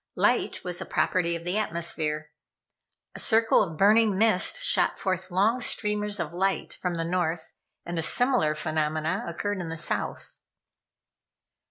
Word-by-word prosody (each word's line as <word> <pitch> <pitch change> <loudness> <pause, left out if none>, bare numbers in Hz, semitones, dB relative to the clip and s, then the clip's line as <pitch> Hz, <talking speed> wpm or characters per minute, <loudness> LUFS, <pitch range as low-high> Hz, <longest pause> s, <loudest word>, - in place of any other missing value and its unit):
Light - - +1
was 180 -1 -3
a - - -4
property 170 -2 0
of 170 - -7
the 180 +5 -1
atmosphere. 155 -5 -2 0.8
A - - -7
circle 225 0 +4
of 165 -5 -3
burning 210 +1 +4
mist 220 - +3
shot - - +2
forth 185 -1 -2
long 210 +7 +1
streamers 210 -2 -1
of 170 -1 -4
light 190 +2 -1
from 180 -2 -3
the 165 0 -2
North, 170 -2 -2 0.3
and 170 -1 -3
a - - 0
similar 245 - +2
phenomena 155 +4 -1
occurred 205 -1 -3
in 170 - -5
the 165 - -5
South. 165 - -2
180 Hz, 150 wpm, -26 LUFS, 165-210 Hz, 0.8 s, circle